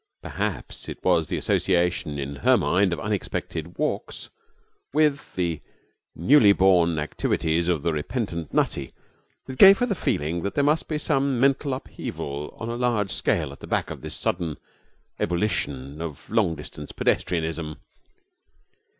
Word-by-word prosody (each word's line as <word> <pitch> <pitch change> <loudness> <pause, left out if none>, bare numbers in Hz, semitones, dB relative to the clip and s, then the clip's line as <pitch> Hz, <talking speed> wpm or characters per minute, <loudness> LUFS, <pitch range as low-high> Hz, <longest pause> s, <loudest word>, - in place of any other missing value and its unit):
Perhaps - - -4
it - - -6
was - - +3
the - - -2
association 85 -4 +1
in 70 0 -4
her - - +4
mind 95 0 +2
of 85 - -2
unexpected 90 -4 -4
walks 150 +1 -3 0.6
with 150 -2 +1
the 85 -4 -1 0.6
newly 105 - +6
born 90 -4 +4
activities 80 +2 0
of 85 -5 0
the 85 - +1
repentant 85 - -3
Nutty - - 0 0.5
that 130 -1 -8
gave 195 0 +10
her 245 - +1
the 230 - 0
feeling 85 - -1
that 100 - -3
there 145 - +2
must 150 +2 +2
be 155 - -1
some 140 -4 +1
mental 135 +2 +2
upheaval 75 - -6
on 110 - -4
a 115 - -3
large 115 -5 0
scale 70 - 0
at 70 - -12
the - - -10
back - - -1
of - - -7
this - - -5
sudden 85 -4 -2 0.6
ebullition 80 -7 -1
of 80 -5 -7
long 80 - +2
distance 75 0 -9
pedestrianism. 80 -3 -1
90 Hz, 150 wpm, -25 LUFS, 80-125 Hz, 0.6 s, gave